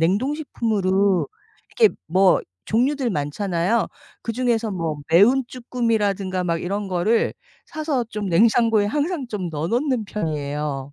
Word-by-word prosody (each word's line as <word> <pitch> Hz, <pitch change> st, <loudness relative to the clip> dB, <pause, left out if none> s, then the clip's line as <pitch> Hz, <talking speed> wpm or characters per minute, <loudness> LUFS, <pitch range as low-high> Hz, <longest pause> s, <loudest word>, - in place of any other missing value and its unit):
냉동식품으로 200 Hz, -, +1 dB, 0.5 s
이렇게 440 Hz, -3 st, +5 dB
뭐 185 Hz, +2 st, +4 dB, 0.2 s
종류들 255 Hz, +3 st, +1 dB
많잖아요. 175 Hz, +6 st, 0 dB, 0.4 s
그중에서 230 Hz, -1 st, 0 dB
뭐 165 Hz, -5 st, -2 dB
매운 230 Hz, +11 st, +5 dB
쭈꾸미라든가 210 Hz, -7 st, -1 dB
막 170 Hz, -1 st, -1 dB
이런 200 Hz, +3 st, -3 dB
거를 190 Hz, +5 st, +1 dB, 0.3 s
사서 300 Hz, -6 st, -2 dB
좀 210 Hz, -2 st, -4 dB
냉장고에 220 Hz, +3 st, +3 dB
항상 295 Hz, -, -1 dB
좀 195 Hz, -6 st, -3 dB
넣어 155 Hz, +1 st, -3 dB
놓는 250 Hz, -1 st, 0 dB
편이에요. 150 Hz, -6 st, -3 dB
205 Hz, 290 characters per minute, -22 LUFS, 175-240 Hz, 0.5 s, 이렇게